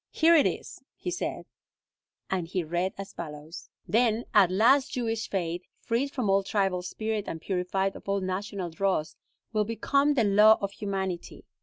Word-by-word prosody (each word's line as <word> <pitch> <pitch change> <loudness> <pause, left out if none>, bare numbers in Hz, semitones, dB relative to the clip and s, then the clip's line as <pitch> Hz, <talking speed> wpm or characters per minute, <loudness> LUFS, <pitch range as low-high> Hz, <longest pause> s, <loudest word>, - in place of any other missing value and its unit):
"Here 330 +1 +4
it 300 - +5
is," - - -5
he 360 - -4
said, 355 - -3 0.8
and 180 -3 -2
he 180 +1 -2
read 175 +4 -2
as 195 0 -7
follows: 155 0 -8 0.2
"Then 230 0 +2
at 195 -4 +6
last 240 +9 +4
Jewish 225 -2 -2
faith, 175 -2 -2 0.2
freed 240 +5 -1
from 255 -5 -2
all 195 0 +4
tribal 195 -2 0
spirit 215 +3 -3
and 165 - -4
purified 190 +2 -1
of - - -9
all 200 0 +1
national 185 -1 -3
dross, 175 -2 -1 0.4
will 215 -1 +2
become 275 +6 +1
the 240 - +3
law 210 +2 +6
of 200 -1 -3
humanity. 190 -4 -4
195 Hz, 165 wpm, -28 LUFS, 180-225 Hz, 0.8 s, at